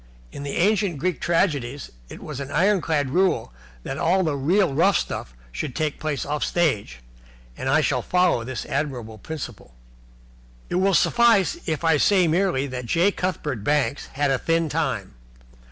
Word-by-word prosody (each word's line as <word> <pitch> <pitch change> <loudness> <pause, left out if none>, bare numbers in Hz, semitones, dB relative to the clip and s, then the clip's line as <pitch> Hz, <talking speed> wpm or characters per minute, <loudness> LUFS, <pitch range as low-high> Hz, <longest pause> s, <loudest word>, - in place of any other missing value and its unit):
In - - -8
the 140 -1 -4
ancient 195 -2 +2
Greek 180 +4 -2
tragedies 145 -7 0 0.2
it - - -10
was 150 -3 -6
an 140 -1 -5
ironclad 160 -5 +1
rule 185 - +1 0.3
that 135 - -5
all 185 +3 +2
the 155 -4 0
real 170 +4 +2
rough 185 +7 +4
stuff 60 - -5 0.2
should 120 - -5
take 155 -3 -2
place 155 -3 -2
off 150 +1 -2
stage, 105 - 0 0.5
and 130 - -3
I 155 +4 +4
shall - - 0
follow 180 -9 +2
this 130 +1 -5
admirable 125 -6 -3
principle. 120 - -8 1.0
It - - 0
will 195 -1 +3
suffice 235 - +4
if 160 -1 -2
I 165 -2 +4
say 185 +3 +4
merely 165 -4 +1
that 125 -3 -6
J. 175 - +3
Cuthbert 150 - -3
Banks 145 +2 0
had 145 0 +1
a 135 - +1
thin 165 -1 0
time. 150 -3 -2
155 Hz, 165 wpm, -23 LUFS, 135-180 Hz, 1.0 s, rough